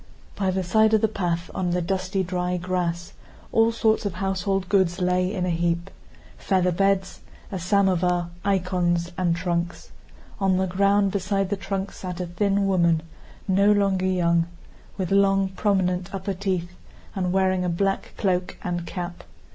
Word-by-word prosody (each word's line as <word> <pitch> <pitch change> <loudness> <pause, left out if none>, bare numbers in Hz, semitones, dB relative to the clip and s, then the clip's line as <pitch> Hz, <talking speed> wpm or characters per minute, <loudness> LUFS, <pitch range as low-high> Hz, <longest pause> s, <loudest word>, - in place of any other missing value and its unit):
By 195 -2 0
the 185 0 0
side 220 +4 +4
of 215 - +2
the 220 - +4
path, 175 -5 -2
on 180 -1 -1
the 175 +1 +1
dusty 190 +1 -1
dry 180 0 -1
grass, 175 -1 -2 0.4
all 225 0 +4
sorts 225 -1 +1
of 200 -4 -3
household 195 0 -1
goods 185 -2 +2
lay 180 0 +1
in 185 -4 -1
a 180 - 0
heap: 170 +2 -1 0.5
featherbeds, 190 +1 +1 0.3
a 190 - -3
samovar, 180 -2 +1
icons, 180 -3 0
and 175 -2 +1
trunks. 170 0 -3 0.5
On 190 -2 +2
the 190 - +1
ground, 200 +2 +2
beside 195 0 -1
the - - +2
trunks, 195 +1 -4
sat 180 -1 -5
a 180 - -2
thin 195 +3 0
woman 170 -4 +2 0.4
no 200 +2 +4
longer 195 -2 +2
young, 170 -2 +2 0.5
with 185 -2 -2
long, 195 -1 +3
prominent 185 -2 0
upper 195 +1 -3
teeth, 185 -2 -2 0.4
and 180 -2 -1
wearing 185 -1 +2
a 180 - 0
black 195 +3 -1
cloak 185 -3 0
and 175 -1 -3
cap. 175 -1 -6
185 Hz, 155 wpm, -24 LUFS, 175-195 Hz, 0.5 s, side